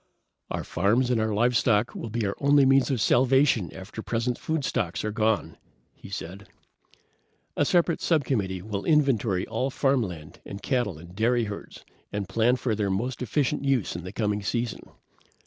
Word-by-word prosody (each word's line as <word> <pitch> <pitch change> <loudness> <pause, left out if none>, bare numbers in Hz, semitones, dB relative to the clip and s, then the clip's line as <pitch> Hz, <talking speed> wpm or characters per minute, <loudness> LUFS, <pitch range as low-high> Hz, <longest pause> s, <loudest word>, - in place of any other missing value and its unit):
"Our - - -3
farms 115 +8 +1
and 115 -3 +2
our 110 0 0
livestock 115 0 +2
will 115 - -6
be 115 0 -2
our 100 - -2
only 140 0 +5
means 135 +1 +4
of 130 -4 0
salvation 125 - +3
after 95 +4 -8
present 120 +2 -2
food 160 -3 -2
stocks 90 -3 -2
are 105 - -1
gone," 110 0 0 0.4
he - - -13
said. 95 +1 -7 1.1
"A 145 - +2
separate 170 +1 +2
subcommittee 110 - 0
will 100 -1 -4
inventory 125 - +2
all 130 - -2
farmland 110 - -1
and 100 - -8
cattle 120 - -1
and 85 +3 -13
dairy 120 +3 +2
herds 105 -2 -8 0.3
and 100 -2 -3
plan 115 +6 +2
for 125 -2 -1
their 105 -2 -1
most 120 +7 -2
efficient 140 +4 0
use 135 -10 0
in 85 - -5
the 90 - -7
coming 105 -1 -1
season. 115 +2 -2
115 Hz, 165 wpm, -26 LUFS, 100-130 Hz, 1.1 s, only